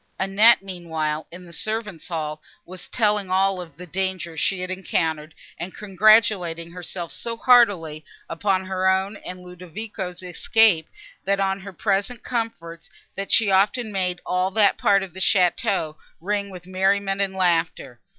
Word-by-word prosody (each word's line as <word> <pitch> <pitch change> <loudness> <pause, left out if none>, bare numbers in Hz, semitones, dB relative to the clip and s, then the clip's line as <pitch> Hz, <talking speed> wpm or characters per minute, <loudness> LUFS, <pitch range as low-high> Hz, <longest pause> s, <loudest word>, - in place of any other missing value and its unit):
Annette, 195 +3 +5
meanwhile, 160 -5 -4
in 180 +1 -11
the 170 - -12
servants' 215 -4 -4
hall, 155 -3 -4 0.2
was 185 0 -10
telling 210 -4 +1
of - - -9
all 190 -1 +1
the 165 +3 -12
dangers 185 -2 -3
she 190 +3 0
had 185 0 -4
encountered, 160 -4 -2 0.2
and 180 +2 -6
congratulating 195 -4 +3
herself 175 -1 -6
so 230 -1 -4
heartily 200 -12 +4 0.2
upon 190 +2 -1
her 190 0 +1
own 190 +2 0
and 185 -2 -9
Ludovico's 180 +1 -7
escape, 180 -1 +3 0.4
and 200 0 +2
on 195 0 0
her 200 +1 -9
present 205 +5 -1
comforts, 170 -9 -5 0.3
that 195 0 -5
she 215 -3 +4
often 210 +4 +2
made 180 -2 -2
all 180 +1 0
that 200 0 +3
part 200 -1 +3
of 185 -4 -9
the 190 - -8
château 180 -4 +1 0.2
ring 200 +3 -2
with 180 -2 -11
merriment 195 +1 +1
and 195 -1 0
laughter. 165 -8 0
190 Hz, 150 wpm, -23 LUFS, 175-200 Hz, 0.4 s, Annette